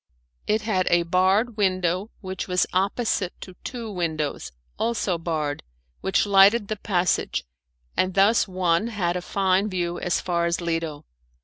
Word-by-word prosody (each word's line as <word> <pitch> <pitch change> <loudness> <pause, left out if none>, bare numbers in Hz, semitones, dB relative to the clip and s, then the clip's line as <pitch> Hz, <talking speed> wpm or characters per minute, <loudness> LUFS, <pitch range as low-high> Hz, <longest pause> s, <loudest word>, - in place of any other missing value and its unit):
It 215 +1 +1
had 190 -4 0
a 175 0 +4
barred 190 +7 +2
window 185 0 0
which 190 -2 -5
was 180 -1 +2
opposite 195 0 0
to 185 - -9
two 235 -3 -5
windows, 160 - -3 0.3
also 210 -6 0
barred, 155 -3 -2 0.4
which 190 - +1
lighted 200 +2 +5
the 215 - -1
passage, 185 -3 0 0.5
and 185 0 0
thus 205 +3 +4
one 185 +1 +1
had 185 -6 -1
a 180 - -2
fine 190 +2 +1
view 175 -2 -2
as 175 - 0
far 170 -2 0
as 170 - 0
Lido. 165 -3 -3
185 Hz, 145 wpm, -24 LUFS, 175-205 Hz, 0.5 s, lighted